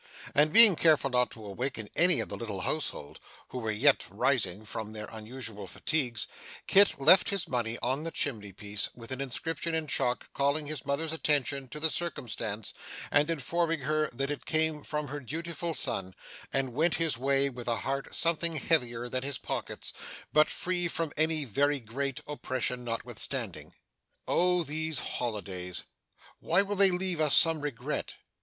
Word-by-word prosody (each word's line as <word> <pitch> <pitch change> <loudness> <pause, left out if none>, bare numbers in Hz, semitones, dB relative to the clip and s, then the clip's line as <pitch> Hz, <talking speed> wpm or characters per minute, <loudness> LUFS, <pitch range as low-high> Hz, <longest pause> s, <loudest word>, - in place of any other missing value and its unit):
And 150 +2 +4
being 225 -2 +10
careful 155 -4 +3
not 125 0 +2
to 110 -2 -12
awaken 110 +2 -4
any 175 -1 +4
of - - -5
the - - -5
little 105 -5 -5
household, 115 - -4 0.3
who 125 - -5
were 110 -2 -3
yet 130 +7 +3
resting 110 -6 0
from 110 0 -6
their 105 -1 -5
unusual 110 -2 -7
fatigues, 125 - -2 0.4
Kit 195 -6 +4
left 160 +7 +6
his 200 -3 -1
money 120 -2 -2
on 130 +4 0
the 165 - -3
chimney 110 -11 -3
piece, 100 +1 -4
with 115 +1 -11
an 130 +1 -3
inscription 160 +5 -3
in 160 -1 -1
chalk 125 -4 -1
calling 140 +2 +1
his 145 -3 -6
mother's 155 +3 -1
attention 140 -3 0
to 150 +5 -7
the 160 0 +3
circumstance, 115 - -2 0.4
and 145 +2 +3
informing 165 +1 0
her 155 +3 0
that 135 +4 -3
it 145 - -6
came 155 -1 +1
from 150 -1 -3
her 145 +1 -5
dutiful 165 +4 -4
son; 95 -10 -1 0.4
and 135 -2 -1
went 160 +6 +2
his 160 -7 -1
way, 135 +1 +3
with 125 -3 -7
a 115 -1 0
heart 135 0 -3
something 170 0 +1
heavier 125 -6 0
than 130 +1 -2
his 135 0 -3
pockets, - - -5 0.4
but 155 0 +5
free 175 -1 +1
from 165 -2 -3
any 155 -1 +2
very 140 +5 +1
great 135 +3 -4
oppression 130 -4 -3
notwithstanding. 115 -1 -4 0.5
Oh 180 0 +2
these 160 0 -2
holidays! 95 -6 -4 0.6
why 180 +5 +3
will 205 +1 -3
they 195 0 +6
leave 180 -2 +2
us 150 -2 +7
some 165 -2 +6
regret? 145 -5 -4
140 Hz, 165 wpm, -29 LUFS, 120-160 Hz, 0.6 s, being